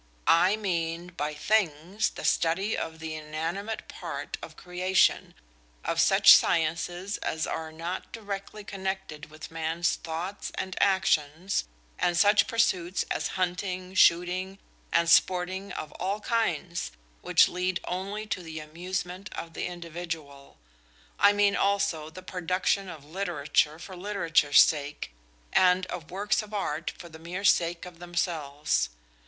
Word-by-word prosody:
"I 180 +5 +5
mean 170 -4 -2
by 150 -1 -2
'things' 185 +2 +1
the - - -8
study 185 +6 +2
of 160 0 -4
the 160 -1 -5
inanimate 165 +8 -4
part - - -5
of - - -10
creation, 180 +1 +1 0.5
of - - +2
such - - +8
sciences 175 +4 +1
as 160 0 -2
are 160 -1 -4
not 170 +3 -5
directly 205 -1 -6
connected 190 -6 -5
with 155 +1 -10
man's 165 +1 0
thoughts 170 +5 -5
and 190 -1 -4
actions, 180 - +2 0.3
and 175 -1 +2
such 205 +3 +5
pursuits 185 -6 +1
as - - 0
hunting, 185 0 -2
shooting, 185 +2 +3 0.3
and 170 0 +3
sporting 185 +3 +3
of 155 - -6
all 195 +3 -1
kinds, 180 -6 -1 0.3
which - - +5
lead 180 0 -1
only 195 +4 -4
to 200 - -3
the 160 -2 -7
amusement 180 +4 -5
of 165 0 -6
the - - -3
individual. 165 -5 -7 0.6
I 205 - +7
mean 205 -1 +3
also 195 -7 +1
the 185 +3 -11
production 185 +2 -1
of 155 -4 -10
literature 155 -3 0
for 185 +3 -9
literature's 175 -6 +4
sake, 145 - 0 0.4
and 185 0 +4
of 170 -3 -6
works 200 +3 0
of 215 0 -8
art 165 -5 -2
for 175 - -10
the 160 -1 -12
mere 175 +4 -6
sake 170 -3 +3
of 175 -2 -11
themselves. 160 - -1
180 Hz, 135 wpm, -28 LUFS, 160-190 Hz, 0.6 s, such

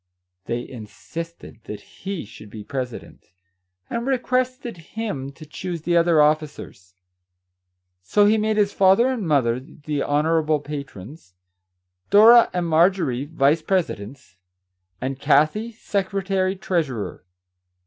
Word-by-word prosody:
They 120 +1 -3
insisted 135 +5 -9
that 105 - -7
he 195 - -7
should 105 0 -13
be 105 0 -9
president, 130 -1 -6 0.6
and 235 +2 -3
requested 255 -2 -1
him 165 -6 -5
to 155 +3 -12
choose 170 +2 -6
the 175 0 +1
other 170 -1 +4
officers. 150 -11 -2 1.1
So 205 - +3
he 215 +1 +4
made 215 0 0
his 205 -1 +2
father 195 +6 +4
and 235 -8 -2
mother 125 -6 +2
the 145 +2 -5
honour 160 +3 +2
able 155 -1 +1
patrons, 140 - -9 0.7
Dora 230 +3 +8
and 180 -1 -1
Marjorie 160 -5 +2
vice 150 0 +2
presi 185 0 0
dents, 100 -2 -12 0.6
and 130 +1 -4
Kathie 210 +14 +2
secretary 195 -2 -1
treasurer. 145 - -3
160 Hz, 120 wpm, -22 LUFS, 135-195 Hz, 1.1 s, Dora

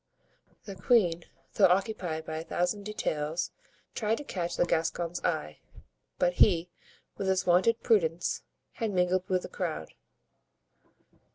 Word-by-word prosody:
The 200 - -7
queen, 180 -4 +2 0.3
though - - +6
occupied 180 -4 0
by 155 0 -4
a 160 - -4
thousand 180 +5 -1
details, 160 -6 -2 0.4
tried 220 0 0
to - - -6
catch 175 -9 -3
the - - +3
Gascon's 170 +1 -1
eye; 75 0 -2 0.6
but 180 0 +2
he, 175 -3 +4 0.5
with 195 - -2
his 190 -1 +1
wonted 185 +6 +3
prudence, 175 -7 +1 0.3
had 225 -2 -3
mingled 180 -1 +1
with 185 -1 +1
the - - -5
crowd. 160 - -4
180 Hz, 130 wpm, -29 LUFS, 165-200 Hz, 0.6 s, though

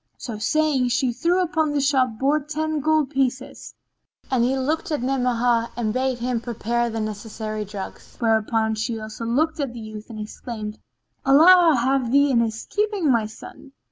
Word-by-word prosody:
So 225 -4 -6
saying, 295 +1 +1
she 250 0 +1
threw 345 +9 +1
upon 315 -3 0
the 290 - +1
shop 265 -5 +1
board 285 +3 0
ten 310 0 -1
gold 310 -1 +1
pieces, 265 -2 -2 0.6
and 250 -3 +2
he 260 +2 +1
looked 300 +6 -1
at 300 -5 -2
Ni'amah 245 -3 +1
and 220 -3 -1
bade 260 0 0
him 240 -1 -2
prepare 235 0 -1
the 225 0 -4
necessary 215 0 -4
drugs; 200 -1 -9
whereupon 220 -1 +1
she 220 +1 -3
also 215 +1 -7
looked 310 +7 0
at 275 -4 -2
the 240 - -8
youth 215 0 -9
and 220 -2 -8
exclaimed, 215 0 -7 0.4
"Allah 325 +4 +7
have 260 -1 +1
thee 280 +1 +4
in 240 - +3
his 225 -1 -2
keeping, 415 -6 0
O - - +6
my 225 -3 +2
son! 265 +5 -13
250 Hz, 175 wpm, -23 LUFS, 225-290 Hz, 0.6 s, Allah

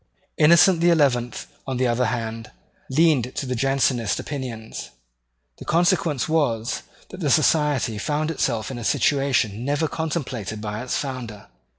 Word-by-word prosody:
Innocent 170 +3 +6
the 175 - +5
Eleventh, 130 -7 +1 0.2
on 130 -2 -2
the 130 - +1
other 120 +1 +1
hand, 115 -2 -4 0.4
leaned 135 -4 +2
to - - -3
the 130 - -2
Jansenist 130 -3 +1
opinions. 125 -6 -6 0.7
The - - -9
consequence 170 -4 +1
was, 125 -8 0 0.3
that 185 - -10
the 155 -6 -1
Society 145 -7 +2
found 150 +7 -1
itself 115 -7 -1
in 125 - -6
a - - -6
situation 125 -5 +1
never 145 +4 0
contemplated 130 - -4
by 105 0 -4
its 125 - -2
founder. 120 -7 -5
130 Hz, 145 wpm, -23 LUFS, 115-150 Hz, 0.7 s, Innocent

